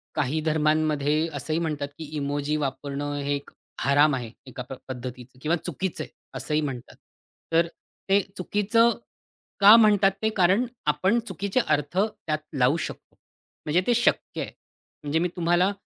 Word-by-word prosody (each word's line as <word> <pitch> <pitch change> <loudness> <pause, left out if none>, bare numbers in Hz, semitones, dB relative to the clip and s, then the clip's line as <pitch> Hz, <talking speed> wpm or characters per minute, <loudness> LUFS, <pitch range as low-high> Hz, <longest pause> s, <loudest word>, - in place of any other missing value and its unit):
काही 145 +2 0
धर्मांमध्ये 155 0 +1
असंही 155 +3 -2
म्हणतात, 150 -4 -2
की 160 - -6
इमोजी 145 +1 -1
वापरणं 140 +1 -3
हे 145 +1 0
एक 140 - -7 0.3
हराम 145 +1 +4
आहे. 120 -3 -5
एका 130 -1 -7 0.2
पद्धतीचं 125 0 -8
किंवा 155 +4 +1
चुकीचं 180 +2 -3
आहे, - - -11 0.3
असंही 150 0 0
म्हणतात. 130 -5 -5 0.6
तर 165 +1 +4 0.4
ते 200 +1 +5 0.2
चुकीचं 210 +5 +3 0.7
का 205 +2 +10
म्हणतात 205 -3 +5
ते 220 - +2
कारण 190 +6 +4 0.2
आपण 185 +10 +2
चुकीचे 200 +5 -1
अर्थ 150 +3 0
त्यात 205 -7 -1 0.2
लावू 130 +5 +3
शकतो. - - -7 0.5
म्हणजे 155 +4 +2
ते 240 - +4
शक्य 240 - +1
आहे. - - -5 0.5
म्हणजे 150 +2 0
मी 175 - +1
तुम्हाला 175 +2 +2
155 Hz, 145 wpm, -25 LUFS, 145-185 Hz, 0.7 s, का